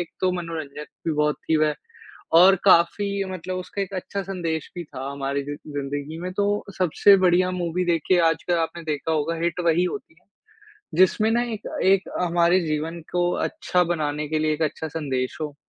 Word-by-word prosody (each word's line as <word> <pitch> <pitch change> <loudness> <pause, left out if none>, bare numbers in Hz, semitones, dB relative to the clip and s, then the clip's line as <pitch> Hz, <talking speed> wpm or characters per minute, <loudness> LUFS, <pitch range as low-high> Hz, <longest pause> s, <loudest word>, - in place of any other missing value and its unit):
एक 175 - -4
तो 185 - +2
मनोरंजक 160 -4 -5 0.2
भी 160 - +1
बहुत 150 0 +1
थी 160 - +4
वह 155 -1 +2 0.7
और 190 +2 +8
काफ़ी 195 +3 +4
मतलब 185 0 -4
उसका 190 +2 -5
एक 195 0 -4
अच्छा 195 +2 -4
संदेश 170 -5 -3
भी 175 - -4
था 135 -3 -7
हमारी 140 0 -2
जी 145 +1 -5
ज़िंदगी 145 +1 -5
में 180 +1 -4
तो 200 +1 +1 0.3
सबसे 185 +3 +5
बढ़िया 185 0 +3
मूवी 180 0 -2
देखिए 175 +1 +2
आजकल 165 +2 -1
आपने 165 +1 -3
देखा 155 0 -2
होगा 160 +1 0
हिट 170 +1 -1
वही 170 +2 +3
होती 180 -2 -4
है, - - -38 0.7
जिसमें 185 +5 +4
ना 235 +1 +2
एक 215 - -6 0.2
एक 190 0 +3
हमारे 175 +1 +3
जीवन 155 +2 -2
को 175 0 +2
अच्छा 180 - 0
बनाने 150 -3 -2
के 155 +1 0
लिए 155 0 +1
एक 160 - -3
अच्छा 155 +1 -2
संदेश 135 -5 -3
हो। 150 -2 -4
170 Hz, 185 wpm, -24 LUFS, 150-185 Hz, 0.7 s, और